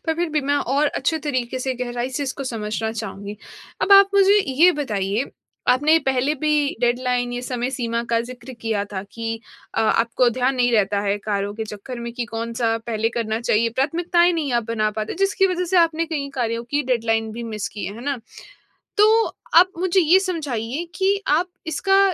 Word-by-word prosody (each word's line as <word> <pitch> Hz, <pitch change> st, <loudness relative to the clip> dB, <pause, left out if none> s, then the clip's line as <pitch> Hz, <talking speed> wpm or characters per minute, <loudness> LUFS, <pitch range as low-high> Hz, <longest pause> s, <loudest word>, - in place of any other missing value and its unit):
पर 320 Hz, -, +1 dB
फ़िर 345 Hz, 0 st, -1 dB
भी 300 Hz, -1 st, +1 dB
मैं 285 Hz, +1 st, 0 dB
और 285 Hz, +2 st, +1 dB
अच्छे 290 Hz, +3 st, -1 dB
तरीके 255 Hz, -4 st, -2 dB
से, 260 Hz, 0 st, -2 dB
गहराई 245 Hz, +1 st, -3 dB
से 290 Hz, -, -1 dB
इसको 275 Hz, 0 st, -4 dB
समझना 220 Hz, -2 st, -3 dB
चाहूँगी। 205 Hz, -1 st, -6 dB, 0.5 s
अब 400 Hz, -, +4 dB
आप 395 Hz, 0 st, +8 dB
मुझे 395 Hz, 0 st, +6 dB, 0.2 s
ये 320 Hz, +8 st, +5 dB
बताइए 215 Hz, -, -2 dB, 0.4 s
आपने 300 Hz, +5 st, +5 dB
पहले 265 Hz, +3 st, +1 dB
भी 305 Hz, 0 st, +2 dB, 0.3 s
डेडलाइन 245 Hz, 0 st, 0 dB
ये 245 Hz, -, -3 dB
समय 250 Hz, 0 st, -2 dB
सीमा 235 Hz, -2 st, -2 dB
का 230 Hz, 0 st, +3 dB
ज़िक्र 245 Hz, +1 st, -9 dB
किया 220 Hz, -3 st, -1 dB
था 190 Hz, -1 st, -3 dB
कि 225 Hz, -1 st, -4 dB, 0.3 s
अ, -, -, +1 dB
आपको 230 Hz, +2 st, +2 dB
ध्यान 255 Hz, +3 st, 0 dB
नहीं 245 Hz, -1 st, +2 dB
रहता 205 Hz, -2 st, +2 dB
है 200 Hz, 0 st, 0 dB
कार्यों 205 Hz, 0 st, -1 dB
के 220 Hz, 0 st, -4 dB
चक्कर 220 Hz, +4 st, -8 dB
में 235 Hz, 0 st, -5 dB
कि 240 Hz, -1 st, -3 dB
कौन-सा 230 Hz, 0 st, -2 dB
पहले 225 Hz, -1 st, 0 dB
करना 220 Hz, 0 st, -1 dB
चाहिए। 230 Hz, 0 st, +2 dB
प्राथमिकताएँ 345 Hz, +5 st, +2 dB
नहीं 300 Hz, -6 st, -1 dB
आप -, -, -11 dB
बना 215 Hz, -2 st, 0 dB
पाते 215 Hz, -, -4 dB
जिसकी 385 Hz, 0 st, +2 dB
वज़ह 360 Hz, -1 st, -1 dB
से 375 Hz, -, +3 dB
आपने 330 Hz, -1 st, +3 dB
कई 280 Hz, -1 st, -2 dB
कार्यों 235 Hz, -2 st, -2 dB
की 290 Hz, 0 st, +1 dB
डेडलाइन 225 Hz, -1 st, 0 dB
भी 235 Hz, +1 st, -6 dB
मिस 210 Hz, -2 st, -3 dB
की 210 Hz, -, -7 dB
है। 200 Hz, -, -6 dB
है 230 Hz, -, -9 dB
ना? 280 Hz, -3 st, -1 dB, 0.8 s
तो 440 Hz, +2 st, +5 dB, 0.3 s
आप 365 Hz, +3 st, +7 dB
मुझे 370 Hz, +1 st, +2 dB
ये 350 Hz, +3 st, +5 dB
समझाइए 295 Hz, -, -3 dB
कि 390 Hz, +1 st, +2 dB
आप 340 Hz, +5 st, +2 dB, 0.2 s
इसका 390 Hz, +5 st, +2 dB
250 Hz, 195 wpm, -22 LUFS, 225-310 Hz, 0.8 s, आप